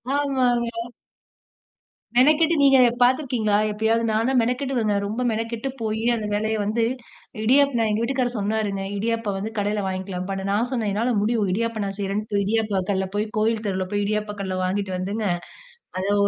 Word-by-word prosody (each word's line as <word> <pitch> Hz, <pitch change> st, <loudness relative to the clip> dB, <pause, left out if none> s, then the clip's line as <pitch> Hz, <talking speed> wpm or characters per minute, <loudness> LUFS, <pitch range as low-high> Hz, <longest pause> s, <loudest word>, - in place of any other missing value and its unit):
ஆமாங்க. 245 Hz, -4 st, 0 dB, 1.3 s
மெனக்கெட்டு. 310 Hz, +6 st, +5 dB
நீங்க 275 Hz, -1 st, +6 dB
அத 245 Hz, -, +6 dB
பார்த்துருக்கீங்களா, 245 Hz, -5 st, +2 dB, 0.2 s
எப்பயாவது 220 Hz, +2 st, +1 dB
நான்னா 225 Hz, +4 st, +1 dB
மெனக்கெடுவங்க, 250 Hz, -2 st, 0 dB
ரொம்ப 220 Hz, +5 st, -3 dB
மெனக்கெட்டு 230 Hz, +3 st, -3 dB
போயி 220 Hz, 0 st, -2 dB
அந்த 215 Hz, -2 st, -3 dB
வேலையை 220 Hz, +1 st, 0 dB
வந்து 225 Hz, +3 st, 0 dB, 0.6 s
இடியாப் 280 Hz, +4 st, +4 dB, 0.2 s
எங்க 210 Hz, +1 st, 0 dB
வீட்டுக்காரர் 245 Hz, -1 st, -1 dB
சொன்னாருங்க, 205 Hz, -1 st, -1 dB
"இடியாப்பம் 225 Hz, -1 st, -1 dB
வந்து 210 Hz, +3 st, -4 dB
கடையில 205 Hz, 0 st, 0 dB
வாங்கிக்கலாம் 185 Hz, -1 st, -4 dB
பா." 195 Hz, -, -1 dB, 0.2 s
நான் 230 Hz, +5 st, +1 dB
சொன்னேன், 225 Hz, -5 st, -1 dB
"என்னால 230 Hz, +4 st, +1 dB
முடியும்." 215 Hz, -2 st, +1 dB
இடியாப்ப 230 Hz, +1 st, -1 dB
நான் 195 Hz, 0 st, -5 dB
செய்கிறேன்ட்டு 200 Hz, +1 st, -1 dB
இடியாப்ப 210 Hz, -2 st, +1 dB
கல்ல 190 Hz, -1 st, 0 dB
போய் 210 Hz, +1 st, +1 dB
கோயில் 220 Hz, 0 st, +1 dB
தெருவில 190 Hz, -2 st, -1 dB
போய், 205 Hz, 0 st, 0 dB
இடியாப்ப 210 Hz, 0 st, -2 dB
கல்ல 185 Hz, -1 st, -3 dB
வாங்கிட்டு 190 Hz, +1 st, -2 dB
வந்துங்க, 200 Hz, +4 st, -3 dB, 0.8 s
அதோ 200 Hz, +2 st, +1 dB
220 Hz, 150 wpm, -23 LUFS, 205-235 Hz, 1.3 s, நீங்க